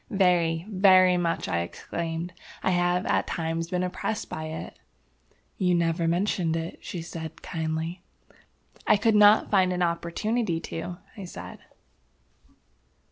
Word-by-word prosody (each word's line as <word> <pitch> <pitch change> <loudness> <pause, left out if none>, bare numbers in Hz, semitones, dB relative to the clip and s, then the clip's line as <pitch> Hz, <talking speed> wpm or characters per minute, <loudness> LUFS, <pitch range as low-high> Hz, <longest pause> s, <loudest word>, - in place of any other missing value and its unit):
"Very, 175 -4 +2
very 185 -3 +5
much!" 170 -1 -1
I 85 - 0
exclaimed. 165 - -4 0.3
"I 190 - +2
have 175 0 +1
at - - +1
times 165 0 -2
been 180 0 0
oppressed 210 +4 -3
by 155 - -4
it." 160 0 -7 0.8
"You 180 -2 +3
never 165 0 +1
mentioned 175 -1 +1
it," 165 0 -5
she 170 -3 -6
said, 160 -1 -8
kindly. 160 +1 -3 0.9
"I - - +6
could 225 +2 +2
not 210 0 +6
find 190 -3 +4
an 180 0 0
opportunity 170 +3 -1
to," 175 +2 -5 0.2
I 200 -4 -7
said. 175 - -9
175 Hz, 135 wpm, -26 LUFS, 165-185 Hz, 0.9 s, I